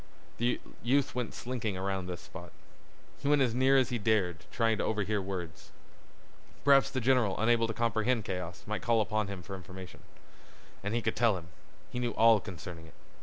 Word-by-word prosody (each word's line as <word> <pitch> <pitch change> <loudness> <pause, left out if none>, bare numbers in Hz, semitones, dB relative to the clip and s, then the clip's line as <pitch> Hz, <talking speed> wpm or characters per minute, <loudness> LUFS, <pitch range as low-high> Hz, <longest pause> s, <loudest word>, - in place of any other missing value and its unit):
The 120 +1 +1 0.2
youth 135 +3 +2
went 125 -2 -3
slinking 115 -5 -3
around 95 -1 -2
this 90 -1 -5
spot. - - -10 0.7
He 140 - -4
went 145 -1 +5
as 120 -3 +1
near 130 +2 +4
as 130 - +3
he 120 - -1
dared 95 -5 +1
trying 115 -2 +1
to - - +1
overhear 105 -1 0
words. 90 -4 -6 1.0
Perhaps 140 -1 +6
the 135 - -2
general, 125 -5 +2
unable 115 +1 +3
to 110 - -3
comprehend 115 0 +1
chaos, 90 -1 -5
might 105 0 -3
call 115 -1 +3
upon 110 -1 0
him 100 -3 -6
for 95 - -6
information. 95 0 -10 0.8
And 105 +3 -1
he 120 - 0
could - - 0
tell 115 -5 +3
him. 85 -1 -10 0.4
He 125 - -3
knew 120 -1 -1
all 115 -1 +6
concerning 85 -3 -8
it. - - -18
110 Hz, 185 wpm, -31 LUFS, 95-120 Hz, 1.0 s, Perhaps